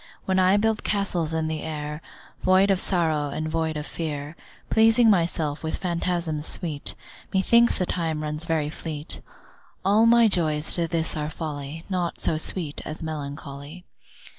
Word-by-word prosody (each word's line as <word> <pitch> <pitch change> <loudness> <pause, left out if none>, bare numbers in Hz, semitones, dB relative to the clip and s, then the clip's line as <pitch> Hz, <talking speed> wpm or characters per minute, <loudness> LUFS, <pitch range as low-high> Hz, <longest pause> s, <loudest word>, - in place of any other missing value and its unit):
When 190 0 +2
I 185 +2 +5
build 220 +1 +1
castles 185 -6 0
in 160 0 0
the 155 -1 -3
air, 150 -1 -5 0.4
Void 190 +2 +4
of 190 - +2
sorrow 160 -5 +1
and 155 +3 -3
void 160 -1 -1
of 150 - -4
fear, 150 -2 -5 0.4
Pleasing 225 +1 +6
myself 165 -5 0
with 160 - -2
phantasms 170 -3 -2
sweet, 155 -5 -2 0.4
Methinks 235 +5 +4
the 185 - +1
time 160 -4 -1
runs 150 +1 -3
very 160 -3 -1
fleet. 155 -1 -6 0.6
All 210 +4 +5
my 235 0 +6
joys 155 -6 +2
to 170 -1 0
this 165 -1 -2
are 150 -1 -2
folly, 155 -1 -6
Naught 180 -3 -2
so 160 - +1
sweet 160 -1 -2
as 155 +1 -7
melancholy. 145 +1 -7
160 Hz, 155 wpm, -25 LUFS, 150-185 Hz, 0.6 s, Pleasing